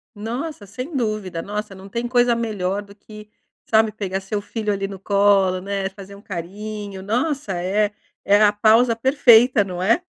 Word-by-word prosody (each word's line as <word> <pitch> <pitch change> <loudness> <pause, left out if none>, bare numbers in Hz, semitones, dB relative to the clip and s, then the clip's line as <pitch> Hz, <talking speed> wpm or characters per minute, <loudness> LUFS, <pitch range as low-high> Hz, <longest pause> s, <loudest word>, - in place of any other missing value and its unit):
Nossa, 230 +3 -5
sem 255 - -7
dúvida 215 -8 -2
nossa 210 +1 -5
não 190 +1 -12
tem 235 +4 -3
coisa 245 -1 +3
melhor 205 -4 -2
do 200 0 -15
que, 210 +1 -13 0.4
sabe, 220 -1 +3
pegar 195 -3 -3
seu 205 +2 -3
filho 215 -1 -3
ali 195 0 -2
no 195 -2 -9
colo 200 -2 +3
né, 195 0 -3
fazer 195 0 -12
um 200 - -14
carinho 200 +2 -6
nossa 245 +3 -1
é 205 +3 0 0.3
é 205 +1 +5
a 210 -1 +5
pausa 225 +3 +4
perfeita, 245 -2 +5
não 180 -2 -5
é? 230 - +2
210 Hz, 170 wpm, -21 LUFS, 195-230 Hz, 0.4 s, é